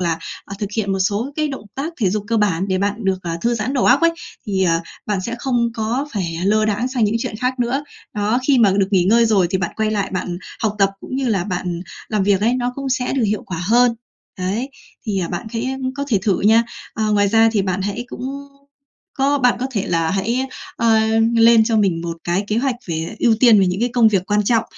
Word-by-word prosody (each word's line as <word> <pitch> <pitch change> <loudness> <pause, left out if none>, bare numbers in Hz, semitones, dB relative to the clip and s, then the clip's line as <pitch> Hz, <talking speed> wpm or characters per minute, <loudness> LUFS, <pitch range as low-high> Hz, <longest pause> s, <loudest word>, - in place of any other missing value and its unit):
là, 170 -2 0 0.3
à, 200 - -8
thực 205 - -2
hiện 200 -3 0
một 195 - -1
số 205 +8 -1
cái 305 -1 0
động 270 -7 -6
tác 300 +5 -4
thể 195 -5 +2
dục 210 +1 -2
cơ 230 - +1
bản 195 -3 +1
để 185 -1 +1
bạn 200 +1 0
được, 190 -1 +1
ờ, 170 - -4
thư 235 +4 +1
giãn 235 +4 -2
đầu 255 - +1
óc - - +5
ấy. 335 0 +4 0.4
Thì, 195 -2 0
à, 165 -2 +2 0.3
bạn 205 -3 -1
sẽ 235 +5 -4
không 240 -2 0
có 230 +6 -1
phải 175 -6 -3
lơ 215 +2 +3
đãng 215 +4 0
sang 250 -3 0
những 210 +2 +1
chuyện 220 - -4
khác 250 +3 -2
nữa. 255 +4 0 0.3
Đó, 210 +3 +1
khi 275 -3 +4
mà 220 -4 +5
được 195 -1 +2
nghỉ 185 -4 +3
ngơi 230 +5 +4
rồi 200 -5 +3
thì 190 - 0
bạn 175 -2 -2
quay 220 -1 0
lại 205 -2 -1
bạn 180 -1 -3 0.2
học 210 -2 0
tập 195 -1 +4
cũng 255 - -6
như 265 -2 0
là 195 -6 0
bạn 180 -2 -3 0.3
làm 210 -2 0
việc 195 0 +2
ấy, 230 +4 +2
nó 250 -1 -1
cũng 275 -1 -4
sẽ 255 -1 -1
được 260 -4 +1
hiệu 210 0 -1
quả 185 - -5
hơn. 240 +2 +4 0.4
Đấy, 200 +8 -2 0.4
thì 200 -3 0
bạn 225 - -4
khẽ 240 +4 -3 0.2
có 280 - -2
thể 220 -7 +2
thử 200 -3 +1
nha. 225 +3 +5 0.3
À, 220 - -1
ngoài 205 -1 +3
ra, 225 +2 +5
thì 205 -3 +1
bạn 190 0 -2
hãy 205 +4 -3
cũng - - -8 1.0
có 280 +2 +2
bạn 250 -2 +3
có 255 - 0
thể 205 -5 -2
là 165 -1 0
hãy, 230 +7 -1 0.3
à, 220 -1 +3 0.3
lên 230 -1 +6
cho 225 0 +1
mình 190 -6 +2
một 170 -1 -4
cái 175 +4 0
kế 215 - 0
hoạch 260 0 0
về 165 +4 -4
ưu 235 -2 +4
tiên 230 -5 +7
về 190 - +3
những 180 +2 -1
cái 240 - +2
công 240 -3 +5
việc 190 -3 0
quan 210 0 +2
trọng. 230 +2 +2
215 Hz, 250 wpm, -19 LUFS, 195-240 Hz, 1.0 s, tiên